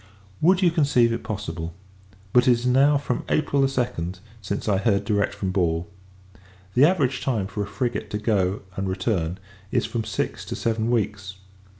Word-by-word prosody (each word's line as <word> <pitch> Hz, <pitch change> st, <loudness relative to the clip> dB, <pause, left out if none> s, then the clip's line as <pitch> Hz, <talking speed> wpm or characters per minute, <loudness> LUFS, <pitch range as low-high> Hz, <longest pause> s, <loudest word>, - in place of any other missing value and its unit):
Would 185 Hz, +3 st, +4 dB
you 175 Hz, -, +5 dB
conceive 140 Hz, -8 st, +3 dB
it 115 Hz, -, -3 dB
possible! 85 Hz, -7 st, -5 dB, 0.6 s
but, 125 Hz, 0 st, +5 dB
it -, -, +7 dB
is 120 Hz, +1 st, -2 dB
now 135 Hz, +4 st, +5 dB
from 135 Hz, -3 st, -2 dB
April 145 Hz, -2 st, +2 dB
2d, 125 Hz, -10 st, -1 dB, 0.2 s
since 100 Hz, +2 st, -4 dB
I 100 Hz, -2 st, +3 dB
have 95 Hz, -, -3 dB
heard 100 Hz, -3 st, +2 dB
direct 100 Hz, -3 st, 0 dB
from 95 Hz, -2 st, -2 dB
Ball. 85 Hz, -3 st, 0 dB, 0.9 s
The 130 Hz, +7 st, +6 dB
average 140 Hz, -7 st, +1 dB
time 115 Hz, -7 st, 0 dB
for 100 Hz, +2 st, -4 dB
a 100 Hz, -, -2 dB
frigate 110 Hz, -1 st, -3 dB
to 105 Hz, -, -2 dB
go, 100 Hz, -3 st, 0 dB
and 95 Hz, 0 st, -2 dB
return, 95 Hz, -3 st, -1 dB, 0.3 s
is -, -, +1 dB
from 115 Hz, -2 st, -2 dB
six 110 Hz, -, -3 dB
to -, -, -4 dB
seven 115 Hz, 0 st, -1 dB
weeks. 105 Hz, -4 st, -1 dB
110 Hz, 180 wpm, -24 LUFS, 95-125 Hz, 0.9 s, it